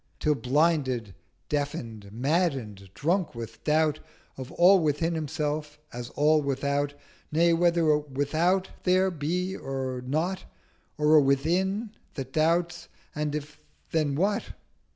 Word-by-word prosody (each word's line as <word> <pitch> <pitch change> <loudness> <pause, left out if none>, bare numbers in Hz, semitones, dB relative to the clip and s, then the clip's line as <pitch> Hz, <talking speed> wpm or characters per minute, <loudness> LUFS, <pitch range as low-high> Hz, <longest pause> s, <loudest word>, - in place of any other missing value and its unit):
Till 150 - +2
blinded, 130 - +1 0.3
deafen'd, 115 -8 -3
madden'd, 125 - -1
drunk 170 0 0
with 115 -1 -8
doubt 155 0 +2 0.4
Of 130 0 -8
all 185 +3 +6
within 160 +1 0
Himself 150 -1 -3 0.2
as 120 0 -6
all 150 +1 +4
without, 140 +1 -1 0.4
Nay, 170 +2 +4
whether 170 -1 +3
a 150 - +3
Without 155 +7 0
there 185 +1 +3
be, 180 +4 -2
or 130 -2 -4
not, 160 +8 -2 0.5
Or 150 +1 +5
a - - +7
Within 180 - +1 0.2
that 135 -2 -6
doubts: 170 +2 +1 0.3
and 150 -1 -2
if, 150 0 -6 0.3
then 150 -4 +1
what? 200 +6 +1
150 Hz, 125 wpm, -27 LUFS, 135-170 Hz, 0.5 s, a